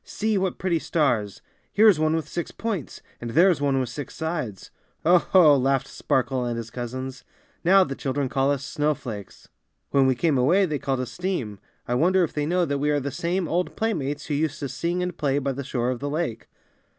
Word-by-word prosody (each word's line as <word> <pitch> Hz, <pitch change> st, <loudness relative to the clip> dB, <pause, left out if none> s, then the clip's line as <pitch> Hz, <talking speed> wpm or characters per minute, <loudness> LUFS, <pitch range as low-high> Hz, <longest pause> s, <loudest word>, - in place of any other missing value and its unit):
See, 220 Hz, 0 st, -1 dB
what 190 Hz, -2 st, 0 dB
pretty 175 Hz, -3 st, 0 dB
stars! 120 Hz, -, 0 dB, 0.3 s
Here 220 Hz, +2 st, +5 dB
is 190 Hz, -7 st, +5 dB
one 155 Hz, +1 st, +2 dB
with 160 Hz, -, -2 dB
six 170 Hz, -, -4 dB
points, 210 Hz, -, -5 dB, 0.2 s
and 120 Hz, -, -4 dB
there 175 Hz, +10 st, +5 dB
is 155 Hz, -, -2 dB
one 140 Hz, -2 st, +2 dB
with 130 Hz, -2 st, -2 dB
six 140 Hz, +2 st, -7 dB
sides. 155 Hz, -, -4 dB, 0.3 s
^^0 175 Hz, +1 st, +6 dB
ho!^' 165 Hz, -6 st, +6 dB
laughed 135 Hz, 0 st, +1 dB
Sparkle 130 Hz, 0 st, -1 dB
and 120 Hz, -1 st, -2 dB
his 115 Hz, 0 st, -6 dB
cousins. 130 Hz, +2 st, -6 dB, 0.4 s
^^Now 185 Hz, +1 st, +5 dB
the 135 Hz, -, -3 dB
children 135 Hz, 0 st, -2 dB
call 135 Hz, +1 st, +1 dB
us 140 Hz, -1 st, -1 dB
snowflakes. 140 Hz, -9 st, -3 dB, 0.4 s
When 135 Hz, -1 st, +4 dB
we 130 Hz, -, +3 dB
came 140 Hz, +1 st, +1 dB
away 175 Hz, +10 st, +4 dB
they 150 Hz, -5 st, -2 dB
called 135 Hz, -1 st, -1 dB
us 125 Hz, -2 st, -5 dB
steam. 115 Hz, -, -3 dB, 0.3 s
I 120 Hz, -, -1 dB
won 165 Hz, +9 st, +3 dB
der 190 Hz, -1 st, +4 dB
if 165 Hz, -, -2 dB
they 150 Hz, -1 st, -1 dB
know 180 Hz, +1 st, +2 dB
that 140 Hz, -2 st, -2 dB
we 145 Hz, +1 st, +1 dB
are 145 Hz, -1 st, +2 dB
the 140 Hz, +1 st, -4 dB
same 175 Hz, +3 st, -1 dB
old 180 Hz, +3 st, -1 dB
playmates 150 Hz, -10 st, -2 dB
who 150 Hz, -, -3 dB
used 150 Hz, 0 st, -1 dB
to 140 Hz, -, -3 dB
sing 175 Hz, +5 st, -2 dB
and 180 Hz, -1 st, -3 dB
play 140 Hz, -4 st, 0 dB
by 140 Hz, -1 st, 0 dB
the 140 Hz, +1 st, -5 dB
shore 125 Hz, -2 st, -1 dB
of 125 Hz, -, -4 dB
the 145 Hz, -, -3 dB
lake. 150 Hz, -6 st, -3 dB
145 Hz, 225 wpm, -25 LUFS, 130-170 Hz, 0.4 s, ^^0